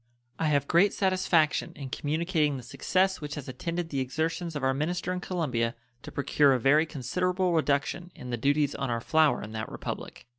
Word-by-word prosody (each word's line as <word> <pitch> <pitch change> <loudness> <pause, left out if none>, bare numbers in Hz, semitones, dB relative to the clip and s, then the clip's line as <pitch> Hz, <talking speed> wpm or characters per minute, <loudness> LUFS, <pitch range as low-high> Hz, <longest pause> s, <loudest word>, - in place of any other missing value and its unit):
I 160 - +1
have 145 -2 +2
great 195 +4 +4
satisfaction 185 -5 +2
in 135 -3 -7
communicating 155 -1 0
the 125 - -8
success 190 +10 0
which 150 0 -5
has 145 -3 -7
attended 170 +6 -4
the 140 - -2
exertions 160 +5 -2
of 145 - -3
our 130 0 +3
minister 175 +6 -1
in 180 - -3
Colombia 130 -11 -1 0.3
to - - -9
procure 140 0 +3
a 130 - +1
very 150 +6 +4
considerable 180 +6 0
reduction 160 +3 0
in 125 - -8
the - - +1
duties 145 +4 +1
on 135 - -3
our 115 -1 0
flour 155 +4 +3
in 105 - -7
that 110 0 -5
Republic. - - -6
150 Hz, 190 wpm, -28 LUFS, 135-175 Hz, 0.3 s, great